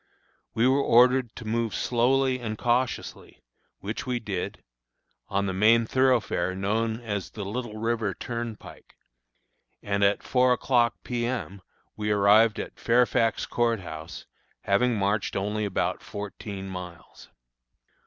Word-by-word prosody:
We 115 +3 +3
were 135 +2 +3
ordered 125 -1 +4
to 115 - -9
move 115 0 -1
slowly 130 +2 +2
and 110 -3 -4
cautiously, 120 +1 -2 0.4
which 110 +6 -5
we 125 -1 -1
did, 100 -5 -5 0.6
on 100 0 0
the 95 - -2
main 110 +4 +4
thoroughfare 115 -8 +1
known 110 +4 -1
as 105 -4 -4
the 105 -3 -7
Little 110 +1 -5
River 110 -3 -1
Turnpike, 115 -2 -7 0.9
and, 100 0 0
at 100 +1 +2
four 125 -1 +3
o'clock, 120 -2 +2
P. 120 -1 -2
M., 110 -6 -4 0.3
we 105 0 -3
arrived 105 +2 +5
at - - -7
Fairfax 115 -1 +2
Court 115 -3 0
House, 80 -2 -8 0.4
having 125 -1 +2
marched 100 0 0
only 105 +2 -1
about 100 - -1
fourteen 100 -1 -7
miles. 90 -2 -9
110 Hz, 130 wpm, -26 LUFS, 100-120 Hz, 0.9 s, arrived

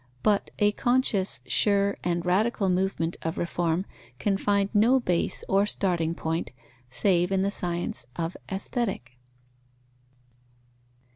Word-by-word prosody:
But 205 -2 +2
a 205 0 +4
conscious, 240 -4 +1
sure, 200 -1 +2
and 175 -1 -1
radical 195 +2 +2
movement 180 -2 0
of 165 0 -3
reform 170 +1 0 0.3
can 195 +8 +1
find 200 0 +1
no 230 +5 +5
base 180 -8 0
or 200 +1 +3
starting 170 -5 0
point, 165 0 -2 0.4
save 180 +6 +2
in 190 -1 +2
the 200 - 0
science 175 -10 -3
of 165 +1 -3 0.2
Aesthetic. 190 - -3
190 Hz, 120 wpm, -27 LUFS, 170-205 Hz, 0.4 s, no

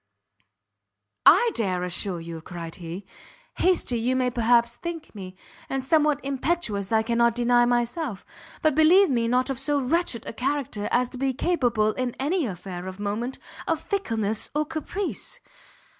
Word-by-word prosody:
"I 455 +9 +7
dare 185 - -1
assure 180 0 -2
you!" 165 -1 -7
cried 170 -1 -7
he; 175 +2 -7 0.5
"hasty 350 -10 +2
you 250 +3 +1
may 255 -1 +1
perhaps 235 0 +3
think 340 -2 -7
me, 190 -3 -8 0.3
and 270 -1 -2
somewhat 300 +1 +3
impetuous 270 - -1
I 220 0 +3
cannot 235 0 +2
deny 240 0 +4
myself; 240 - -1 0.4
but 310 - +4
believe 320 +4 +6
me 235 -2 +1
not 255 +3 +1
of 265 - -2
so 285 +2 +1
wretched 275 -2 -1
a - - -6
character 250 -4 -2
as 245 0 +2
to 250 - -9
be 270 0 +1
capable, 245 -10 +1
in 250 +1 -3
any 305 +2 0
affair 180 -1 -6
of 190 +1 -8
moment, 215 +5 -3 0.3
of 325 -1 +1
fickleness 225 - -1
or 305 0 +1
caprice." 340 +5 -5
245 Hz, 155 wpm, -25 LUFS, 210-295 Hz, 0.5 s, I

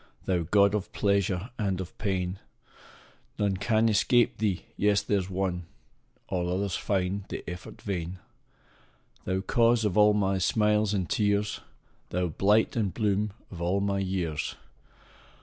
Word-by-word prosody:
Thou 90 -2 +1
god 100 +4 +4
of 105 0 -2
pleasure 100 0 0
and 100 -3 0
of 95 -2 -6
pain! 95 -2 -1 1.0
None 100 -2 +1
can 110 +2 +2
escape 110 +2 +3
thee 105 -4 -1
yes 100 0 +2
there 100 - +1
s 95 0 -5
one 90 -2 -2 0.6
All 90 -1 -1
others 95 0 -1
find 95 0 -1
the - - -6
effort 90 +2 -8
vain: 90 -2 -3 1.1
Thou 95 +1 0
cause 115 +3 +3
of 105 0 +2
all 105 0 +6
my 95 -2 +1
smiles 105 +1 +2
and 95 -3 -1
tears! 105 -1 +1 0.5
Thou 90 0 -1
blight 105 +7 +2
and 105 -5 0
bloom 105 +1 0 0.2
of 85 -3 -8
all 90 +3 +1
my 100 0 0
years! 90 -6 -1
70 - - -5
LINES. - - -25
100 Hz, 150 wpm, -28 LUFS, 90-105 Hz, 1.1 s, all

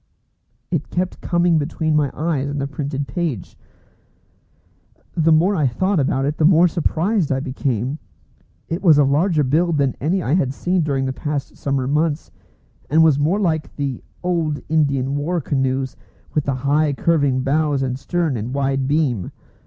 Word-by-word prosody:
It 160 -4 -2
kept 180 +1 -3
coming 170 -2 +2
between 155 +1 -1
my 150 -2 +2
eyes 150 -4 -1
and 145 0 -3
the 140 - -1
printed 140 0 -4
page. 135 - -3 1.6
The 165 -1 +2
more 175 +6 +4
I 150 -6 +2
thought 185 +9 0
about 135 -1 +1
it 150 +2 -2
the - - +2
more 170 +2 +6
surprised 175 +2 0
I 135 - +1
became. 130 0 -2 0.7
It 165 +3 -3
was 165 -6 +6
of 140 -2 +4
larger 155 +1 +2
build 160 +4 +1
than 140 -2 +1
any 175 +6 0
I 135 - 0
had 140 -7 +1
seen 180 +3 0
during 140 -4 0
the 130 - -2
past 145 0 -4
summer 135 -2 -1
months, 150 +2 0 0.6
and 160 +2 +5
was 155 -3 +4
more 165 +8 +1
like 160 -6 -1
the 140 -4 -3 0.2
old 165 -5 0
Indian 140 -4 +1
war 170 +5 -1
canoes 135 -2 -1 0.4
with 150 - 0
the 140 - 0
high 145 +3 +1
curving 140 -3 +1
bows 145 0 +1
and 130 0 -2
stern 170 -3 -1
and 115 +5 -4
wide 135 -1 0
beam. 140 - 0
145 Hz, 170 wpm, -20 LUFS, 135-165 Hz, 1.6 s, more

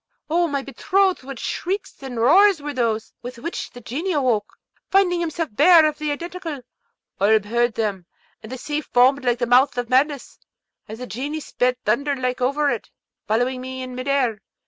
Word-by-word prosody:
O 345 +1 +3
my 280 -3 -2
betrothed, 380 +7 +1
what 270 0 -8
shrieks 380 - -4
and 260 -3 -7
roars 365 - +5
were 290 0 -5
those: 230 -4 -1
with 245 0 -8
which 335 +9 -5
the 245 - -12
Genie 320 +12 -3
awoke, 245 -8 0 0.3
finding 375 -2 +3
himself 330 -2 -2
bare 320 +6 +7
of 305 0 -1
the 305 -1 -1
Identical! 335 -1 -5 0.6
Oolb 210 +1 +4
heard 235 +2 0
them, 200 -6 -2 0.3
and 220 - -11
the 260 - -5
sea 295 +4 -3
foamed 260 +1 +3
like 245 -1 +1
the 240 - 0
mouth 255 +4 +4
of 245 -1 -2
madness, 275 +1 +1 0.5
as 220 - -8
the 250 - -6
Genie 280 +6 -4
sped 250 -4 -1
thunder 280 +7 +1
like 255 -1 -2
over 280 +3 +1
it, - - -4 0.4
following 245 +4 0
me 260 0 -6
in 255 0 -7
mid 255 +2 -6
air. 255 -6 +1
265 Hz, 185 wpm, -22 LUFS, 245-305 Hz, 0.6 s, bare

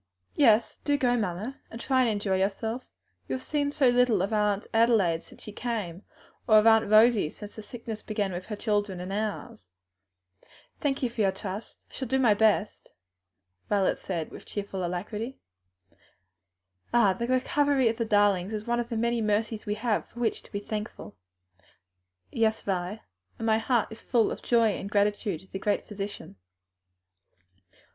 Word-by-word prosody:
"Yes, 225 -5 +4
do 290 -1 +2
go, 245 -3 +2
mamma, 215 +4 -3
and 230 - -8
try 260 +1 +2
to - - +2
enjoy 205 -3 0
yourself. 220 +5 -1 0.4
You - - -2
have 255 - -6
seen 290 -1 0
so 280 -3 +3
little 245 -6 +3
of 200 - -2
Aunt 210 -1 +1
Adelaide 220 -8 +3
since - - -16
she 210 - -8
came, 205 -6 -4 0.5
or 215 - +6
of 215 - +5
Aunt 225 -1 +5
Rosie, 215 -5 +5
since 210 +5 -11
the 220 - -7
sickness 225 -1 -7
began 210 -3 -2
with 180 +1 -5
her 215 - -5
children 205 -3 -1
and 180 +2 -5
ours. 210 - -4 1.1
Thank 275 -2 -1
you 250 - +2
for 230 - -2
your 195 -2 +3
trust, 200 +2 -7
I - - -22
shall 260 - -4
do 265 - +1
my 245 -5 +5
best," 210 -1 +1 0.8
Violet 200 -2 +2
said 170 -4 -4
with - - -11
cheerful 200 -2 -4
alacrity. 210 +8 -4 1.5
"Ah, 225 -5 +4
the 235 +5 -3
recovery 265 +1 +2
of 225 0 0
the 230 - 0
darlings 205 -3 +2
is 215 0 -4
one 240 0 0
of 240 0 -3
the 230 - -2
many 235 +1 +1
mercies 215 +1 -1
we 210 - 0
have 220 0 -1
to 240 -2 -2
be 200 - -3
thankful 210 - -6
for!" 90 -1 -41 0.7
"Yes, 220 -1 +1
Vi, 190 +2 -2 0.4
and 225 - -4
my 220 -1 +3
heart 230 -1 +1
is 220 - -10
full 235 -4 +2
of - - -6
joy 230 -2 +3
and 200 -1 -4
gratitude 205 -3 0
to 190 - -17
the 190 - -4
Great 205 +1 0
Physician." 200 - -7
215 Hz, 175 wpm, -28 LUFS, 200-235 Hz, 1.5 s, or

